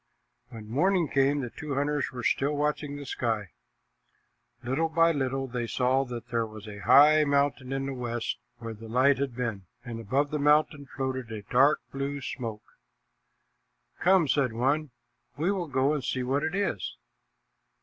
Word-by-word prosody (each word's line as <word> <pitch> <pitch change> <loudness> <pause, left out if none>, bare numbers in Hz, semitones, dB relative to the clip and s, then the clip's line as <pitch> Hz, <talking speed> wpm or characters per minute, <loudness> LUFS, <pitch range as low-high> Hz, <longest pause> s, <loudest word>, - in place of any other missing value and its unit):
When 110 -2 -10
morning 175 - +2
came, 140 +1 +2
the 120 -3 -5
two 150 -3 -5
hunters 145 +1 0
were 125 -2 -6
still 145 +2 +1
watching 150 0 -1
the 145 0 -7
sky. 110 -7 -2 1.1
Little 135 +7 0
by 165 +1 +4
little 135 -2 -1
they 120 -2 -3
saw 130 +3 +1
that 120 -2 -7
there 115 -1 0
was 110 0 -11
a 105 -1 -8
high 150 +8 +6
mountain 140 -2 +1
in 135 0 -1
the 135 - -3
west 120 -2 -3 0.2
where 115 -1 -6
the 110 +1 -11
light 130 +4 +3
had 135 -4 -2
been, 115 -7 -3 0.2
and 120 -2 -6
above 135 +7 0
the 150 - -1
mountain 150 0 +3
floated 130 -3 -4
a 105 -2 -6
dark 135 +8 +3
blue 140 +1 -3
smoke. 115 -5 -5 1.4
"Come," 185 -3 +4
said 135 -4 +1
one, 140 +6 0 0.5
"we 165 +6 +1
will 185 -4 -2
go 140 +1 +1
and 145 -4 -2
see 130 0 -1
what 135 +3 0
it 160 +4 -2
is." 115 - -2
135 Hz, 170 wpm, -28 LUFS, 120-145 Hz, 1.4 s, high